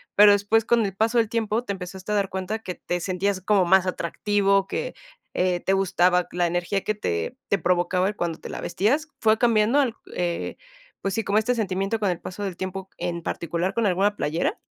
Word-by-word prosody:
pero 205 0 +8
después, 205 +2 +3
con 235 -3 +3
el 195 -1 -4
paso 225 +3 +1
del 225 -2 +4
tiempo, 225 0 0
te 200 - -2
empezaste 190 +2 -7
a - - +2
dar 200 -1 +1
cuenta 190 +4 -3
que 185 -5 -6
te 175 0 -3
sentías 185 +1 -1
como 195 -1 +3
más 190 +1 +5
atractivo, 195 +2 +1
que, 485 +2 -3 0.4
eh, 180 -1 +1
te 195 - +1
gustaba 180 -2 +3
la 175 0 +1
energía 175 +3 -1
que 215 - 0
te 85 - -2
te 200 - +3
provocaba 180 +3 +1
cuando 170 -5 -3
te - - -9
la - - -5
vestías. 265 - 0
¿Fue 220 0 +4
cambiando 235 +3 +4
el, 245 -5 0 0.2
eh 175 -1 -2 0.4
pues 195 +2 -2
sí, 225 - 0
como 200 +1 +1
este 235 +3 +2
sentimiento 195 0 -1
con 205 -3 +1
el 175 - -5
paso 195 +3 -6
del 185 -3 -4
tiempo, 190 +1 -5
en 170 -1 -3
particular 170 +3 -2
con 230 -2 0
alguna 195 +3 +2
playera? 165 - -1
195 Hz, 210 wpm, -24 LUFS, 180-215 Hz, 0.4 s, pero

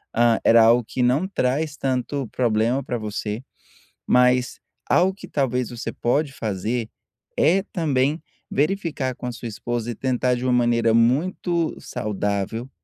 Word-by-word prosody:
hã, 115 -1 +4
era 115 0 +6
algo 120 +2 +5
que 130 - -3
não 135 +9 +2
traz 150 -3 -1
tanto 130 0 -2
problema 120 +3 +1
para 125 - -3
você, 105 +2 -4 0.6
mas 125 0 +3 0.3
algo 190 +2 +3
que 190 - -11
talvez 125 -6 -1
você 120 -1 -5
pode 140 +4 0
fazer 110 +1 -3 0.5
é 190 +4 +3
também 150 -3 0 0.3
verificar 150 -4 -1
com - - -8
a 125 - -2
sua 120 0 -7
esposa 120 +1 -3
e - - -6
tentar 125 0 0
de 125 - -5
uma 125 - +2
maneira 120 -2 +3
muito 160 +8 +1
saudável 105 +3 -3
125 Hz, 145 wpm, -23 LUFS, 115-140 Hz, 0.6 s, era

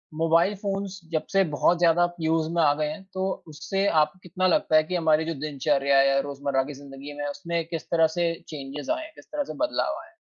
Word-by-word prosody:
Mobile 165 +5 +3
phones 195 -1 -4
जब 155 -1 -1
से 195 0 +5
बहुत 175 +4 +3
ज़्यादा 175 0 +4
यूज़ 160 0 +1
में 170 - +3
आ 145 -1 +5
गए 150 0 -1
हैं 200 +1 -7
तो 190 0 -1 0.2
उससे 175 +6 -2 0.2
आप 150 - +1
को 185 - -24
कितना 185 +1 0
लगता 160 -2 +2
है 155 - +6
कि 180 +3 -4
हमारी 160 -2 +3
जो 165 - -2
दिनचर्या 140 -1 +1
है 135 - +5
या 135 0 +3
रोज़मर्रा 140 -1 -1
की 145 +2 -7
ज़िंदगी 140 +1 -10
में, 145 0 -5
उसमें 170 +2 -3
किस 165 -6 -6
तरह 165 -1 +5
से 170 -1 +2
चेंजेज़ 145 - -5
आए 320 0 -1
हैं, 320 - -10
किस - - -15
तरह 295 -1 -1
से - - -7
बदलाव 315 +1 -1
आया 330 - -16
है? 345 - -32
160 Hz, 240 wpm, -26 LUFS, 145-185 Hz, 0.2 s, है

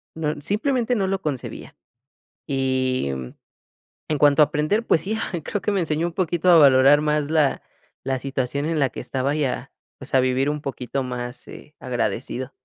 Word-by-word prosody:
no 155 -2 -2
simplemente 240 - 0
no 195 -4 0
lo 195 0 -1
concebía. 140 -5 -5 0.7
Y, 130 - 0
mm, 65 -2 -6 0.8
en 150 - 0
cuanto 145 +1 +5
a - - +9
aprender, 155 +10 0
pues 160 - +3
sí, 210 +7 -3
ah, - - -4
creo 205 - -3
que 210 - 0
me 195 - +1
enseñó 160 0 0
un 175 - -4
poquito 175 0 -1
a 175 - +8
valorar 140 0 +6
más 150 -1 0
la 155 -4 +2 0.4
la 135 0 -1
situación 135 +1 -2
en 165 -1 -1
la 140 -2 +3
que - - -7
estaba, 135 +2 -2
y, 150 -1 0
a 130 0 -3 0.3
pues 135 - -9
a 130 - +6
vivir 130 +2 +1
un 150 0 -3
poquito 135 -1 -3
más, 125 -1 -6
eh, 150 - -12
agradecido. 125 0 -3
145 Hz, 190 wpm, -23 LUFS, 130-160 Hz, 0.8 s, a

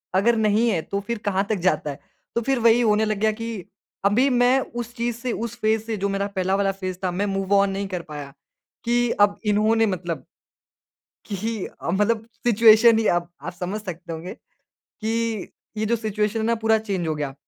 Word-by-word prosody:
अगर 225 +5 +4
नहीं 220 +2 +3
है, 180 -7 +1
तो 200 +5 -3
फिर 230 +4 -4
कहाँ 195 -1 +1
तक 215 - +1
जाता 155 -4 +1
है। 140 - -9 0.4
तो 235 - +1
फिर 270 +2 0
वही 230 +1 +5
होने 215 -1 +3
लग 215 -1 -1
गया 215 +1 +3
कि, 225 -4 -6 0.4
अभी 235 +7 +4
मैं 250 +1 +4
उस 240 -1 -6
चीज़ 235 -1 -1
से, 245 +1 -3
उस 235 0 -4
फ़ेज़ 220 0 +2
से 225 -1 -3
जो 200 +1 -1
मेरा 200 0 -1
पहला 190 +1 +1
वाला 195 0 +1
फ़ेज़ 185 -2 -5
था, 185 - 0
मैं 190 +3 -1
मूव-ऑन 195 0 +2
नहीं 195 +1 -3
कर 185 -2 -4
पाया। 145 -2 -7 0.5
कि 240 0 +2
अब 205 0 +4
इन्होंने 215 +2 +3
मतलब 180 -4 -3 1.1
कि 215 +1 -3 0.2
मतलब 215 +3 +1 0.2
सिचुएशन 225 0 +7
ही 225 - 0
अप 175 0 +1
आप - - -5
समझ 185 +4 -4
सकते 175 -3 -7
होंगे, 165 +3 -6 0.5
कि 225 -1 -3 0.3
ये 215 - 0
जो 235 +2 +2
सिचुएशन 215 -1 -1
है 220 - -1
ना, 230 +1 +2
पूरा 220 0 +2
चेंज 195 -6 -3
हो 155 - -1
गया। 145 -2 -3
210 Hz, 200 wpm, -23 LUFS, 190-230 Hz, 1.1 s, सिचुएशन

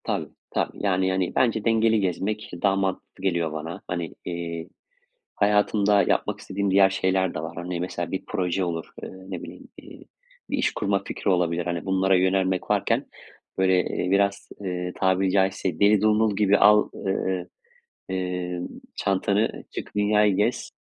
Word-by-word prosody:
Tabii, - - -2 0.2
tabii - - -2
yani, 95 -2 +2
hani, 95 -1 -1
bence 115 -4 +2
dengeli 115 -1 +3
gezmek 100 +3 -2
daha 100 -1 +4
mantıklı 95 -1 -3
geliyor 85 -4 0
bana. 80 +2 -6
Hani, 85 -2 -4
eee, 85 -1 -4 0.7
hayatımda 105 0 +3
yapmak - - 0
istediğim 100 0 -2
diğer 95 0 +6
şeyler 95 -1 0
de - - -4
var. 80 +1 -6
Hani, 90 0 -4
mesela 85 -1 -4
bir 95 - -3
proje 90 +1 -1
olur, 85 -2 -3 0.2
ııı, 95 +1 -10
ne 90 - -5
bileyim, - - -10
iii, - - -13 0.4
bir 285 - -1
iş 255 - +1
kurma 100 -1 0
fikri - - -3
olabilir. 85 -1 +1
Hani, 85 0 -3
bunlara 95 0 +2
yönelmek 95 0 +1
varken, - - +1 0.5
böyle, 95 -1 +4
eee, 90 - -2
biraz, 100 0 +1
eee, 90 -2 -3
tabiri 95 0 +2
caizse 95 -3 0
deli 105 0 +5
dumrul 110 0 +3
gibi 100 0 +4
al 105 +1 +5
ııı, 95 -2 -2 0.6
emm, 90 -1 -3 0.3
çantanı 100 +2 0
çık - - -6
dünyayı 105 -1 +3
gez. 105 +5 0
95 Hz, 155 wpm, -25 LUFS, 90-100 Hz, 0.7 s, diğer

